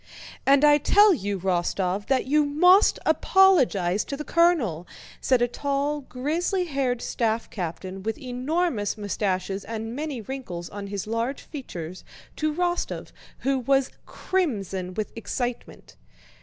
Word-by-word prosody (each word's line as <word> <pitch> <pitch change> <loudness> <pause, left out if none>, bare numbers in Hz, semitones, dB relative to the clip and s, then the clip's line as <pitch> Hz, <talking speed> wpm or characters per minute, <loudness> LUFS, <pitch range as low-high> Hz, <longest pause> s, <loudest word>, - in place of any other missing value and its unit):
"And 280 +2 +6
I 295 0 +6
tell 410 +7 +6
you, 200 - -3
Rostóv, 185 +2 -1
that 265 -2 +1
you 300 +3 +3
must 360 +8 +5
apologize 245 - +3
to 280 - -5
the 300 - -5
colonel!" 290 - +2 0.3
said 255 -2 +3
a - - +3
tall, 285 +3 -2
grizzly 320 +9 -1
haired 265 -6 -1
staff 225 -1 -1
captain, 185 +1 -5
with 220 +3 -3
enormous 255 - -1
mustaches 195 -1 -2
and 225 +1 -5
many 295 -3 -4
wrinkles 210 -8 -6
on 200 -1 -7
his 200 -1 -4
large 230 +5 -2
features, 185 - -8 0.3
to 310 0 0
Rostóv 350 +2 -2 0.3
who 270 0 +1
was 270 +1 +1 0.2
crimson 195 - -2
with 215 -1 -3
excitement. 240 +2 -5
250 Hz, 130 wpm, -25 LUFS, 200-295 Hz, 0.3 s, And